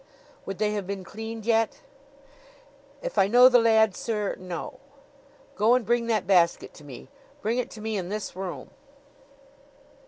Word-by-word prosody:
"Would 195 - -5
they 210 -1 0
have 205 -3 -4
been 195 -1 -5
cleaned 220 +3 -8
yet?" 225 -1 +1 1.2
"If - - -2
I 190 - +5
know 245 +4 +7
the 245 -1 +5
lad, 220 -3 +4
sir 210 -3 -2
no." 180 -2 -7 0.8
"Go 220 +4 +4
and 250 -3 0
bring 235 +2 +1
that 215 -4 0
basket 175 -3 +2
to 150 - -15
me. 135 -3 -11 0.4
Bring 230 +4 0
it 250 - -3
to 215 - -11
me 220 -1 -2
in 180 -2 -4
this 210 -2 -5
room." 180 -8 -6
215 Hz, 160 wpm, -26 LUFS, 190-230 Hz, 1.2 s, know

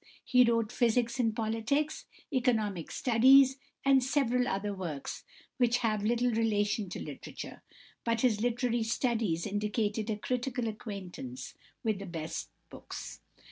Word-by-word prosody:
He 250 -1 +5
wrote 230 -2 +2
"Physics 240 +1 +1
and 225 -3 +2
Politics," 225 +7 -1 0.3
"Economic 220 - +1
Studies," 265 +2 +5 0.3
and 270 -1 +5
several 250 -2 +1
other 200 0 -1
works 170 -7 -5 0.3
which 245 -2 +3
have 215 -2 +1
little 240 +3 +2
relation 210 -2 +1
to - - -5
literature; - - -8 0.4
but 230 -1 0
his 220 -5 +2
"Literary 240 0 +1
Studies" 225 -7 0
indicated 210 +1 -1
a 215 - -1
critical 245 +1 -2
acquaintance 185 - -6 0.3
with 215 -3 0
the 200 - -7
best 165 -2 -5 0.2
books. - - -8
225 Hz, 130 wpm, -31 LUFS, 205-245 Hz, 0.4 s, He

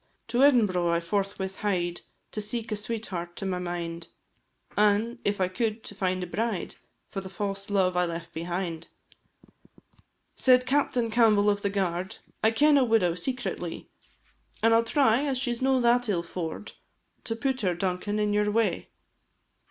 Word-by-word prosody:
To 240 +2 0
Edinbro' 210 -11 +4
I 170 0 +2
forthwith 195 +1 -2
hied 175 -4 -1 0.3
To 215 - -2
seek 225 +2 -3
a - - +1
sweetheart 205 -5 -3
to 195 - -5
my 185 -1 -1
mind, 170 -1 -4 0.7
An', 210 +4 +2
if 205 0 0
I 185 - +2
could, 215 +4 -2
to - - -7
find 185 -2 -1
a - - -2
bride 210 +1 -3 0.3
For 195 - -3
the 190 - -8
fause 195 0 -4
love 190 -3 +2
I 180 0 +3
left 170 0 -6
behind; 170 0 -4 1.5
Said 250 -1 +5
Captain 250 -3 +1
Campbell 215 -3 +4
of 205 0 -2
the 200 - 0
Guard, 190 +1 -2 0.3
"I 220 - +6
ken 290 +5 +4
a - - +4
widow 225 -8 +3
secretly, 190 -3 -4 0.7
An' 225 0 +5
I - - +7
'll 230 - +3
try, 250 -1 +3
as 275 -3 0
she 250 -1 0
's 235 - -6
no 265 0 +3
that 240 -1 +3
ill 175 -4 0
faur'd, 170 +2 -5 0.5
To 225 - -1
put 265 +2 -1
her, 180 -4 +1
Duncan, 185 +3 -2
in 210 -1 +1
your 210 0 +2
way." 225 +2 0
205 Hz, 170 wpm, -27 LUFS, 180-230 Hz, 1.5 s, I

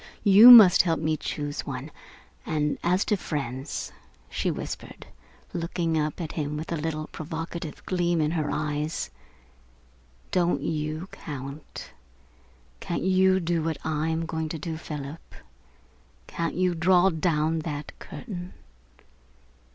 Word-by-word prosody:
You 210 +3 +9
must 220 -7 +10
help 165 -3 0
me 155 0 0
choose 145 -1 -4
one. 135 +2 -6 0.5
And 150 -1 -1
as 180 +3 +2
to 210 - +2
friends," 140 -6 -4 0.4
she - - -1
whispered, - - -6 0.5
looking 170 -1 -1
up 150 -1 -1
at 165 -3 -4
him 150 -1 -3
with 160 +3 -6
a - - 0
little 155 0 -3
provocative 160 0 -6
gleam 175 -2 +1
in 155 0 +1
her 155 -3 -1
eyes, 150 +1 -2 1.2
"don't 175 -1 +1
you 155 +2 -3
count? 140 0 -8 0.9
Can't 170 - -3
you 190 0 +4
do 170 -1 0
what 160 -1 -2
I 155 0 -1
am 160 +1 -1
going 160 -1 -3
to 160 - -4
do, 160 +2 -5
Philip? 150 -1 -8 0.9
Can't 165 -1 -3
you 180 0 +2
draw 180 +2 +4
down 160 -1 0
that 150 -2 -5
curtain?" 185 -6 -8
160 Hz, 130 wpm, -26 LUFS, 150-175 Hz, 1.2 s, must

